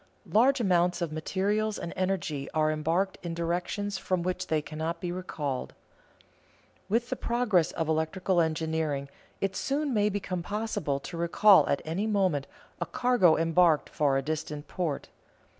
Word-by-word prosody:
Large 260 +5 +4
amounts 180 -4 +2
of 165 - -3
materials 200 +7 -1
and 170 - -5
energy 180 -7 -2
are 155 0 +3
embarked 165 +5 0
in 170 -2 -4
directions 180 +4 -2
from 185 -2 -1
which 185 +1 -2
they 155 - +1
cannot 160 +3 -4
be 175 0 -3
recalled. 150 -7 -4 1.1
With 235 +4 0
the - - +1
progress 230 -8 +1
of 165 - -2
electrical 170 +3 +1
engineering 160 -3 -1 0.3
it 195 -1 -1
soon 280 +3 -1
may 210 -1 +3
become 195 -3 -3
possible 205 -8 -2
to 170 - -7
recall 170 0 +5
at 140 - 0
any 180 +7 -1
moment 185 -10 +1 0.3
a - - -1
cargo 245 -10 +3
embarked 165 -1 +3
for 140 -3 +1
a 135 - -1
distant 150 0 -4
port. 170 -6 -3
175 Hz, 150 wpm, -28 LUFS, 155-200 Hz, 1.1 s, recall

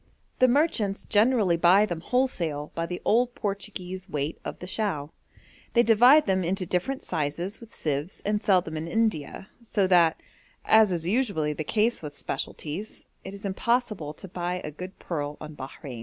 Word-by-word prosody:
The 255 - +6
merchants 240 -8 +1
generally 210 -5 +3
buy 185 +5 +5
them 175 -5 -4
wholesale 170 - -1
by 165 0 -2
the 180 0 -4
old 245 +2 +2
Portuguese 195 -3 -5
weight 145 -1 -3
of - - -6
the - - -8
chao. 180 -7 -2 0.6
They 235 - +5
divide 245 +7 +6
them 190 -2 +1
into 185 +2 -1
different 185 +11 -1
sizes 160 +7 -3
with 230 -2 -13
sieves 150 +4 -3
and 210 0 0
sell 190 -3 +4
them 160 -2 -6
in 160 +2 -4
India, 210 -4 -1
so 210 -4 0
that, 175 -3 +4 0.5
as 220 -2 +6
is 170 -2 -2
usually 190 - +1
the 155 - -4
case 225 +7 +1
with 150 -2 -7
specialties, 175 +8 -5 0.2
it 190 - -7
is 200 +1 -9
impossible 200 -6 -1
to 190 - -10
buy 180 0 -3
a 150 - -5
good 180 +5 -9
pearl 150 -3 -4
on 155 0 -8
Bahrein. 130 -2 -8
185 Hz, 170 wpm, -26 LUFS, 160-215 Hz, 0.6 s, The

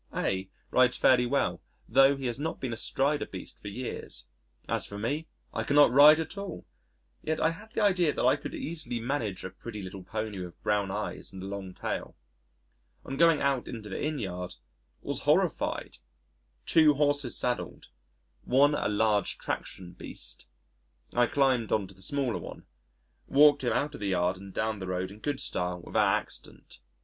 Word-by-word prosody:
A 95 0 -1 0.2
rides 125 -1 +4
fairly 125 -1 +4
well 140 +3 0 0.3
tho' 135 +3 +5
he 135 - -6
has 120 +1 -2
not 160 +2 -3
been 125 -3 -3
astride 140 +6 0
a - - -3
beast 95 - -9
for - - -8
years. 120 +5 -6 0.4
As - - -1
for 100 - -7
me, 145 +10 -2 0.3
I - - -1
cannot 145 -2 +5
ride 150 +4 +8
at 160 +5 -4
all! 200 -4 -6 0.6
Yet 155 0 -1
I 160 - +3
had 210 +7 -11
the - - +1
idea 180 -6 +3
that - - -1
I 130 - +5
could 145 - -7
easily 155 -7 -4
manage 115 -7 -2
a 95 - -5
pretty 105 +2 -8
little 95 +1 -7
pony 110 +1 -4
with 90 -2 -8
brown 105 -2 +1
eyes - - -4
and 95 -1 -8
a - - -5
long 95 -2 -6
tail. - - -4 0.9
On 135 - -4
going 165 +1 +5
out 140 -3 +1
into 110 -3 -7
the - - -4
Inn 150 0 -1
yard, 90 -6 -5 0.5
was - - -2
horrified - - 0 0.7
two 155 -3 +5
horses 145 -3 +1
saddled 125 0 -3 0.5
one 140 +4 +4
a 125 - 0
large 105 -1 +1
traction 90 -1 -5
beast.... - - -8 0.7
I 120 0 +4
climbed 130 -5 +2
on 105 -3 +2
to 95 - -13
the 95 - -20
smaller 135 +2 0
one, - - -9 0.6
walked 145 0 +6
him 120 - +1
out 150 +1 0
of - - -8
the 100 - -1
yard 90 -1 +1
and 100 +1 -10
down 110 +1 -1
the 95 - -5
road 90 +1 -2
in 105 - -12
good 145 +2 -2
style 90 0 -2
without - - +2
accident. - - -12
120 Hz, 180 wpm, -29 LUFS, 100-145 Hz, 0.9 s, ride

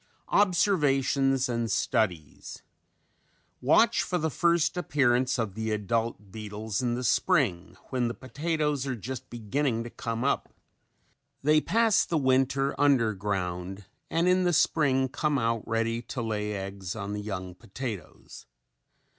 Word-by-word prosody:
OBSERVATIONS 140 -9 +2
AND 115 -2 -1
STUDIES 90 - -2 1.0
Watch - - +4
for 180 - -1
the 160 -2 -1
first 170 +1 +2
appearance 130 -7 +1
of 110 -5 -2
the 110 +2 -3
adult 105 -1 -2
beetles 105 0 -4
in 120 -1 0
the 125 - -4
spring 105 - +1
when 125 -2 +1
the 115 - -4
potatoes 150 +2 -2
are 130 - -1
just 125 +3 -7
beginning 120 +1 -1
to 120 - -8
come 115 +1 -4
up. 140 - -1 0.9
They 155 +2 +4
pass 225 +2 +3
the 165 - -1
winter 135 0 +2
under 130 -7 +4
ground 95 -1 -3 0.2
and 165 +2 +1
in 185 0 +4
the 175 -1 +2
spring 140 -5 +3
come 145 +2 -1
out 115 -2 0
ready 115 +1 0
to 120 +1 -5
lay 105 -1 -2
eggs 95 -1 -5
on 100 -2 -4
the 105 - -3
young 95 -3 -5
potatoes. 105 - -8
120 Hz, 140 wpm, -28 LUFS, 105-140 Hz, 1.0 s, Watch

